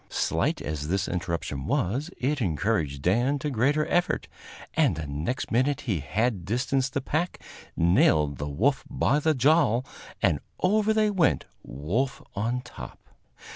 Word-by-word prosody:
Slight - - 0
as 75 -1 -4
this 95 +2 0
interruption 85 -6 -3
was, 130 - 0
it 140 +2 -1
encouraged 80 -6 -1
Dan 120 - +2
to 145 +2 -3
greater 140 +6 +2
effort, 175 0 0 0.5
and - - +3
the 80 -1 -5
next 75 - -3
minute 130 +4 +2
he 105 - -1
had 105 - -1
distanced 130 +6 0
the 140 - 0
pack, 155 +6 -2 0.4
nailed 75 -5 +3
the 75 0 -3
wolf 125 - +1
by 145 - +2
the 155 +1 +2
jowl, 135 -3 +3 0.3
and - - +2 0.2
over 210 +3 +2
they 215 -1 +3
went, 180 -7 +2 0.2
wolf 90 - -2 0.2
on 115 +5 -1
top. - - -10
120 Hz, 145 wpm, -26 LUFS, -, 0.5 s, and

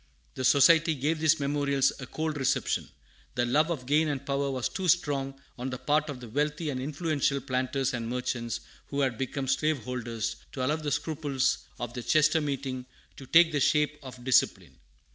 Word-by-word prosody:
The - - -5
Society 160 +4 +5
gave 150 +4 -1
these 155 -1 +3
memorials 140 -1 +1
a 125 - -7
cold 155 +2 -3
reception. 135 -2 0 0.5
The 120 - +1
love 150 +6 +2
of 145 -7 -3
gain 150 +4 +3
and 140 -2 -3
power 140 0 0
was 130 -2 -1
too 190 -1 -4
strong, 140 -5 +1 0.2
on 130 +2 -3
the 125 - -4
part 150 +3 +1
of 140 -3 -5
the 125 - -9
wealthy 150 +5 -1
and 130 -2 -3
influential 145 -1 0
planters 130 0 -1
and 115 -2 -3
merchants 120 -2 -3 0.3
who 140 0 -2
had 130 -4 +1
become 135 +1 -3
slaveholders, 120 -5 -1 0.2
to 130 -2 -2
allow 150 +4 +1
the 155 -2 -3
scruples 145 -3 0 0.2
of 120 -1 -4
the 125 - -5
Chester 155 +5 +3
meeting 135 -3 -3 0.3
to 135 - -11
take 165 +2 +6
the 145 - 0
shape 150 +2 +2
of 130 -3 -10
discipline. 130 -1 +1
140 Hz, 180 wpm, -28 LUFS, 130-150 Hz, 0.5 s, take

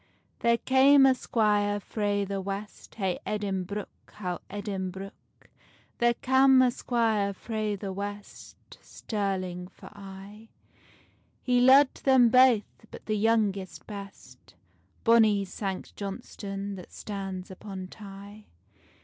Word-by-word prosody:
There 235 0 +3
came 270 +2 +5
a 265 - +6
squire 210 -4 +1
frae 205 -1 -1
the 195 0 -3
west, 200 +2 -7
Hey 190 -5 -2
Edinbruch, 200 -1 -3 0.3
how 180 -4 -4
Edinbruch. 195 -1 -5 0.9
There 240 0 +3
cam 265 +1 +4
a 250 - +3
squire 225 -5 0
frae 215 0 -3
the 195 -1 -5
west, 205 +1 -9
Stirling 185 -4 -4
for - - -14
aye: 200 +2 -11 1.0
He 245 -1 +2
lo'ed 265 +2 +6
them 260 -3 +5
baith, 245 -3 +3
but - - -12
the 215 - -1
youngest 205 -3 0
best, 200 -2 -11 0.5
Bonny 220 -4 +4
Sanct 190 0 -5
Johnstonne 200 -1 -6
that 180 - -11
stands 195 -3 -6
upon 190 0 -8
Tay. 200 +1 -12
205 Hz, 115 wpm, -28 LUFS, 195-230 Hz, 1.0 s, a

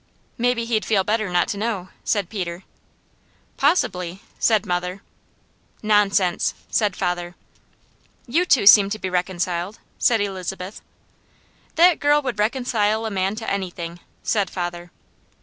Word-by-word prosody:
"Maybe 245 -1 0
he'd 225 -2 0
feel 200 -3 +2
better 215 0 0
not 175 -1 +2
to 200 - -3
know," 205 -5 -2
said 205 -4 0
Peter. 180 -3 -5 0.9
"Possibly!" 190 - 0 0.2
said 220 -2 +3
mother. 180 +1 -3 0.8
"Nonsense!" 205 -4 +2 0.2
said 210 -4 +1
father. 175 -1 -2 0.9
"You 325 +9 +1
seem 205 -5 +7
to 215 - -3
be 185 -3 -4
reconciled," 180 +1 -2 0.2
said 230 -2 +3
Elizabeth. 190 -1 -4 0.9
"That 345 0 +5
girl 290 +1 +4
would 250 -6 -3
reconcile 220 -1 +1
a 220 - -3
man 195 +1 -1
to 225 0 -7
anything," 175 -3 -4 0.2
said 205 -4 0
father. 175 -1 -5
200 Hz, 125 wpm, -22 LUFS, 180-220 Hz, 0.9 s, seem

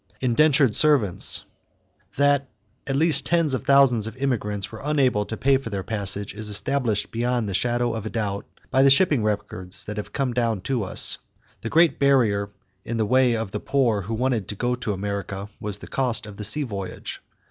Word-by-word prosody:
=Indentured 135 -1 +3
Servants.= 140 - +2 0.7
That 140 -1 +2 0.4
at 135 - -1
least 145 -3 +3
tens 165 -4 +2
of 130 - -2
thousands 135 -6 +4
of 110 +2 -8
immigrants 105 -7 -2
were 110 - -9
unable 135 -8 +1
to 110 - -5
pay 135 0 +3
for 130 -3 -7
their 100 -3 -4
passage 100 -2 -2
is 105 +1 -4
established 105 -1 0
beyond 120 -1 -1
the 100 - -4
shadow 120 +3 0
of 110 -1 -4
a - - -4
doubt 105 -3 -3 0.2
by 130 - +3
the 135 - +6
shipping 145 -2 +4
records 100 -3 -2
that 105 0 -6
have 105 - -5
come 135 -3 -1
down 115 -4 0
to 125 +1 -1
us. 95 - +3 0.4
The 115 - -4
great 165 +3 +3
barrier 115 -8 +2 0.3
in 115 - -4
the 110 - +1
way 125 +1 +3
of 110 -3 -4
the 105 - -3
poor 120 -7 +1
who 110 +5 -4
wanted 120 -4 -1
to 105 - -5
go 120 +4 -1
to 125 -3 -3
America 100 0 -4
was 105 -1 -3
the - - -11
cost 120 -4 -1
of 105 -1 -11
the 105 - -6
sea 150 +8 +2
voyage. 100 -7 -6
115 Hz, 195 wpm, -23 LUFS, 105-135 Hz, 0.7 s, the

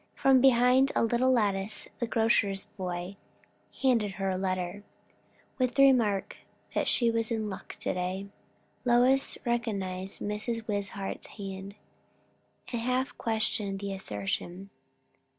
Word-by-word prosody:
From 265 -2 +5
behind 255 +1 +5
a - - +3
little 240 +3 +3
lattice 205 -4 0
the 235 - -1
grocer's 220 -4 +2
boy 185 -2 -5 0.7
handed 230 -7 +3
her 195 0 -1
a - - -1
letter, 185 0 -2 0.8
with 255 0 +1
the 275 - +6
remark 215 -7 +3 0.4
that - - 0
she 235 -2 +3
was 230 -1 0
in 220 -3 -2
luck 190 0 -8
to - - 0
day. 185 +2 -3 0.6
Lois 250 +2 +3
recognized 195 -6 -2
Mrs. 220 +2 -3
Wishart's 200 -1 -4
hand, 195 0 -7 1.0
and 235 -2 -2
half 255 +2 0
questioned 220 -3 0
the 200 0 -4
assertion. 175 - -4
210 Hz, 125 wpm, -29 LUFS, 195-240 Hz, 1.0 s, the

